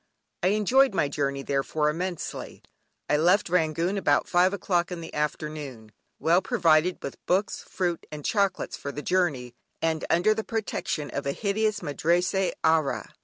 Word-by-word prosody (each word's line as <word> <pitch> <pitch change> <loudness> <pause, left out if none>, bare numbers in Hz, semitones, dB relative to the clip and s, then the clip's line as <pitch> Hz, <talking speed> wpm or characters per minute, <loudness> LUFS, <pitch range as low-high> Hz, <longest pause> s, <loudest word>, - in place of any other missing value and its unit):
I 180 - +2
enjoyed 215 +4 +3
my 145 - +2
journey, 140 -1 -2
therefore, 140 +2 0
immensely. 175 +3 -4 0.4
I 150 - +2
left 175 +4 +3
Rangoon 170 +3 +1
about - - +2
five 180 +1 +4
o'clock 180 -3 0
in 180 - -4
the 165 - -9
afternoon, 150 -6 -4 0.3
well 170 +3 +3
provided 175 -7 +3
with 140 - -7
books, 195 +3 0
fruit 175 -2 -2
and 150 -1 -7
chocolates 200 -3 0
for 140 - -6
the 145 +1 -6
journey, 150 -10 0 0.3
and 160 -1 -1
under 180 +6 +4
the 220 0 -3
protection 215 -9 -3
of 140 0 -3
a 140 - 0
hideous 215 +1 -1
Madrassee 175 +5 +1
Ayah. 160 -3 +1
170 Hz, 155 wpm, -26 LUFS, 150-190 Hz, 0.4 s, five